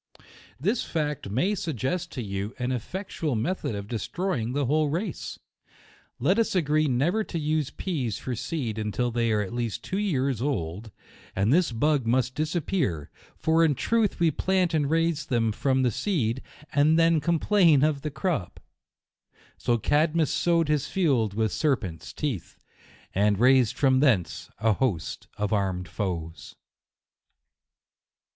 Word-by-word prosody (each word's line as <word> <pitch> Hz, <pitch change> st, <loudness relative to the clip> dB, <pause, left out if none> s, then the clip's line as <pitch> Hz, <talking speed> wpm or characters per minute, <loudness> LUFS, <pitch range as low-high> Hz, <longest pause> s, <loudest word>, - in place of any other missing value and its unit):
This 205 Hz, -, 0 dB
fact 150 Hz, -9 st, -3 dB
may 150 Hz, -, +1 dB
suggest 165 Hz, -, -2 dB
to 125 Hz, -, -4 dB
you 100 Hz, +2 st, -4 dB
an 125 Hz, 0 st, -2 dB
effectual 155 Hz, -, -3 dB
me 115 Hz, +10 st, 0 dB
thod 120 Hz, -, -4 dB
of 100 Hz, 0 st, -6 dB
destroying 115 Hz, -, -2 dB
the 145 Hz, 0 st, 0 dB
whole 150 Hz, +3 st, +2 dB
race. 175 Hz, +3 st, -4 dB, 0.8 s
Let 180 Hz, -, +2 dB
us 225 Hz, -, +1 dB
agree 155 Hz, -3 st, +2 dB
never 150 Hz, -, +1 dB
to 170 Hz, -, -5 dB
use 155 Hz, -2 st, 0 dB
peas 135 Hz, -, -3 dB
for 130 Hz, -, -4 dB
seed 120 Hz, -3 st, -3 dB
until 110 Hz, +3 st, -1 dB
they 115 Hz, -1 st, +1 dB
are 105 Hz, -1 st, +2 dB
at 100 Hz, -, -7 dB
least 120 Hz, -3 st, -3 dB
two 190 Hz, -, -2 dB
years 135 Hz, -, 0 dB
old, 105 Hz, -, -2 dB, 0.5 s
and 100 Hz, +6 st, +2 dB
this 175 Hz, -4 st, +3 dB
bug 135 Hz, +1 st, +1 dB
must 130 Hz, +2 st, +1 dB
disappear; 155 Hz, -, -1 dB, 0.3 s
for 160 Hz, +1 st, +3 dB
in 155 Hz, -3 st, +3 dB
truth 225 Hz, -, +1 dB
we 170 Hz, -2 st, +4 dB
plant 185 Hz, +2 st, +1 dB
and 145 Hz, -3 st, +1 dB
raise 165 Hz, -1 st, +1 dB
them 115 Hz, -3 st, +1 dB
from 130 Hz, +4 st, +1 dB
the 125 Hz, -, +2 dB
seed, 130 Hz, -, -1 dB, 0.3 s
and 150 Hz, +3 st, +4 dB
then 165 Hz, -1 st, +4 dB
complain 170 Hz, -1 st, +4 dB
of 150 Hz, -2 st, +1 dB
the 150 Hz, -, -3 dB
crop. 145 Hz, -, -2 dB, 1.0 s
So 120 Hz, -, 0 dB
Cadmus 155 Hz, +6 st, +2 dB
sowed 170 Hz, -2 st, +2 dB
his 150 Hz, -1 st, +1 dB
field 130 Hz, -, +1 dB
with 110 Hz, -2 st, +1 dB
ser 150 Hz, -3 st, +2 dB
pents' 85 Hz, -9 st, -8 dB
teeth, 135 Hz, -, -4 dB, 0.6 s
and 100 Hz, +1 st, +2 dB
raised 125 Hz, -2 st, +4 dB
from 130 Hz, -2 st, +4 dB
thence 115 Hz, -, +1 dB
a 110 Hz, +2 st, +2 dB
host 100 Hz, -8 st, -2 dB
of 105 Hz, +1 st, -1 dB
armed 95 Hz, -3 st, -1 dB
foes. 85 Hz, -6 st, -5 dB
135 Hz, 150 wpm, -26 LUFS, 110-160 Hz, 1.0 s, we